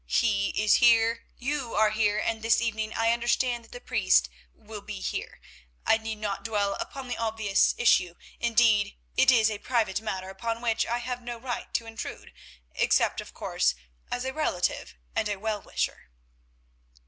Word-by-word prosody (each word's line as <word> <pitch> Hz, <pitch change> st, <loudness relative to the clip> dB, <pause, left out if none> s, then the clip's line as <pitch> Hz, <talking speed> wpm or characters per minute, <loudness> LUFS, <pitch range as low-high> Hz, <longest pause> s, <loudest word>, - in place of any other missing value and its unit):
He 200 Hz, -4 st, +2 dB
is 210 Hz, 0 st, +5 dB
here, 230 Hz, -1 st, +4 dB
you 270 Hz, -2 st, -3 dB
are 215 Hz, -1 st, +4 dB
here, 210 Hz, -1 st, +1 dB
and 220 Hz, +1 st, -1 dB
this 225 Hz, +1 st, +3 dB
evening 220 Hz, -2 st, -2 dB
I 225 Hz, 0 st, +2 dB
understand 240 Hz, +1 st, 0 dB
that -, -, -21 dB
the 245 Hz, -, -8 dB
priest 60 Hz, -, +2 dB, 0.2 s
will -, -, -10 dB
be -, -, -7 dB
here. -, -, -4 dB, 0.5 s
I 225 Hz, -, +4 dB
need 220 Hz, 0 st, -4 dB
not 210 Hz, -2 st, -3 dB
dwell 205 Hz, -3 st, 0 dB
upon 270 Hz, -2 st, -6 dB
the 245 Hz, -, -3 dB
obvious 220 Hz, -3 st, +2 dB
issue; 180 Hz, -7 st, +3 dB, 0.2 s
indeed, 225 Hz, -3 st, +3 dB, 0.2 s
it 265 Hz, -, +5 dB
is 220 Hz, -4 st, +5 dB
a 210 Hz, -, -4 dB
private 220 Hz, -5 st, 0 dB
matter 190 Hz, -3 st, -4 dB
upon 230 Hz, +4 st, -3 dB
which 230 Hz, -1 st, 0 dB
I 235 Hz, -, 0 dB
have 245 Hz, 0 st, -4 dB
no 240 Hz, 0 st, -6 dB
right 245 Hz, +1 st, -5 dB
to 230 Hz, -, 0 dB
intrude, 225 Hz, 0 st, -8 dB, 0.4 s
except, -, -, +2 dB
of -, -, -13 dB
course, -, -, 0 dB, 0.4 s
as 245 Hz, -, -2 dB
a 265 Hz, -, -2 dB
relative 185 Hz, -, -1 dB, 0.2 s
and 210 Hz, -, 0 dB
a 205 Hz, -, -1 dB
well 210 Hz, 0 st, -2 dB
wisher." -, -, -3 dB
225 Hz, 170 wpm, -27 LUFS, 210-235 Hz, 0.5 s, is